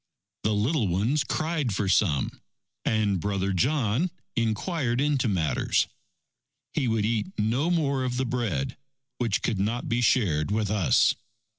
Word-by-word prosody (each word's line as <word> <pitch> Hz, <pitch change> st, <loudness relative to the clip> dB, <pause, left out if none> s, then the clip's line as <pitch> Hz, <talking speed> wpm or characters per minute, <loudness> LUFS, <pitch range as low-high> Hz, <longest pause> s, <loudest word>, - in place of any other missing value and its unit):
The 110 Hz, -, +1 dB
little 115 Hz, +3 st, +1 dB
ones 110 Hz, -, +1 dB
cried 155 Hz, -, -1 dB
for 100 Hz, 0 st, -1 dB
some, 90 Hz, -7 st, +1 dB, 0.4 s
and 105 Hz, -4 st, +1 dB
Brother 100 Hz, +1 st, -1 dB
John 130 Hz, -, +1 dB, 0.3 s
inquired 120 Hz, -, 0 dB
into 140 Hz, -3 st, +1 dB
matters. 85 Hz, -7 st, +1 dB, 0.9 s
He 130 Hz, -, 0 dB
would 110 Hz, -2 st, +1 dB
eat 115 Hz, -, -1 dB
no 120 Hz, +10 st, +1 dB
more 140 Hz, -6 st, +1 dB
of 125 Hz, -1 st, -2 dB
the 130 Hz, -, 0 dB
bread, 115 Hz, -, -2 dB, 0.4 s
which 115 Hz, -5 st, 0 dB
could 110 Hz, -5 st, 0 dB
not 115 Hz, +5 st, -1 dB
be 120 Hz, +1 st, 0 dB
shared 100 Hz, -, +2 dB
with 105 Hz, -1 st, 0 dB
us. 105 Hz, -5 st, +4 dB
115 Hz, 140 wpm, -26 LUFS, 100-130 Hz, 0.9 s, us